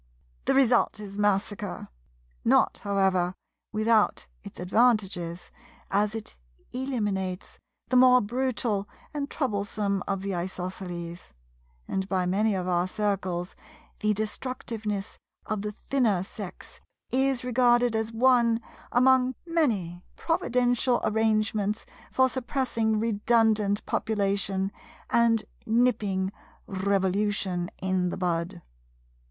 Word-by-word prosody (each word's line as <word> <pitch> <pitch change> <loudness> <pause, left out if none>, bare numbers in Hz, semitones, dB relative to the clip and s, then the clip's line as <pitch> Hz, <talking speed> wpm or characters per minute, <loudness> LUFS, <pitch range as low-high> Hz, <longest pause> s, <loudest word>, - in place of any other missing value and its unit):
The - - +2
result 245 -5 +3
is 200 -2 -8
massacre; 205 0 -1 0.6
not, - - +3
however, 190 -3 +1 0.4
without 215 - +2 0.2
its - - -10
advantages, 185 -4 +1 0.4
as 205 +2 +1
it 220 -1 -7 0.4
eliminates 210 -8 -3 0.3
the 255 - +1
more 250 0 +7
brutal 235 -3 -1 0.2
and 285 -1 -3
troublesome 205 - -1
of 195 -1 -2
the 200 0 -2
Isosceles; 175 - -5 0.5
and 190 0 -2
by 185 -2 +1
many 200 +3 +2
of 185 -1 -2
our 175 0 +1
Circles 185 -3 -2 0.4
the 210 0 +1
destructiveness 215 -2 -4 0.3
of 215 -2 -2
the 210 0 -3
Thinner 215 -4 0
Sex 195 -1 -9 0.3
is 265 -1 +1
regarded 245 -1 +3
as 220 0 -1
one 235 -1 +4 0.3
among 255 +1 +4
many 220 - 0
providential 245 -5 +1
arrangements 215 -1 +1 0.3
for 260 0 +4
suppressing 240 -4 -1
redundant 220 -2 +2
population, 200 -2 0 0.4
and 230 -2 +4 0.2
nipping 215 -5 +1 0.3
Revolution 190 -1 0
in 185 -1 +1
the - - -4
bud. 170 -2 -2
210 Hz, 100 wpm, -27 LUFS, 190-240 Hz, 0.6 s, more